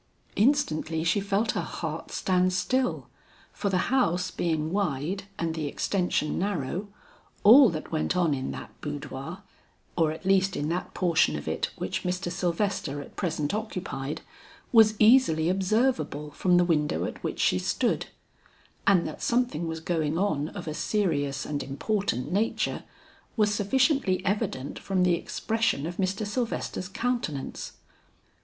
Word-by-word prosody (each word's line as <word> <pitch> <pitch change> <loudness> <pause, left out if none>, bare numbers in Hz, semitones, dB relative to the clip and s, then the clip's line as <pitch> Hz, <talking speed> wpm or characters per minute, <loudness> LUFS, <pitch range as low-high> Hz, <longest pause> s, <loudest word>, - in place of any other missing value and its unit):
Instantly 165 - +2
she 170 +4 +2
felt 200 +3 +1
her - - -1
heart - - -5
stand 185 -1 +1
still, 255 +7 0 0.5
for 200 - -2
the 185 +4 0
house 185 -8 +2
being 160 -3 -1
wide 190 0 -1
and 165 -1 -1
the 160 -2 -3
extension 180 -1 0
narrow, 190 0 -2 0.6
all 240 +4 +9
that 155 -3 -5
went 160 +3 0
on 170 -4 +3
in 135 -1 -3
that - - -7
boudoir, 145 +4 -6 0.5
or 160 -3 +2
at 160 - -8
least 190 0 +3
in 145 +1 -2
that 175 +2 -3
portion 175 -3 +3
of 75 - -6
it - - -1
which - - -3
Mr. 180 0 -2
Sylvester 175 -4 -1
at 145 - -10
present 155 -5 -1
occupied, 185 -10 -4 0.5
was 220 -2 +6
easily 215 -9 +5
observable 190 - 0
from 180 +4 +2
the 175 - +4
window 150 -3 +1
at - - -7
which - - -3
she 90 - +3
stood; 90 - 0 0.8
and 190 -4 +5
that - - -8
something 235 -10 0
was 160 0 -4
going 160 -2 -1
on 155 -7 0
of 180 -4 -8
a 155 - -2
serious 145 -8 0
and 145 -1 -3
important 140 - -2
nature, 210 +5 0 0.5
was 210 -1 +3
sufficiently 205 - +2
evident 200 - -2
from 190 -2 0
the 180 -1 +4
expression 215 -1 -1
of 175 +2 -5
Mr. 195 +3 -1
Sylvester's 215 -4 -3
countenance. 215 - -3
180 Hz, 145 wpm, -27 LUFS, 155-205 Hz, 0.8 s, all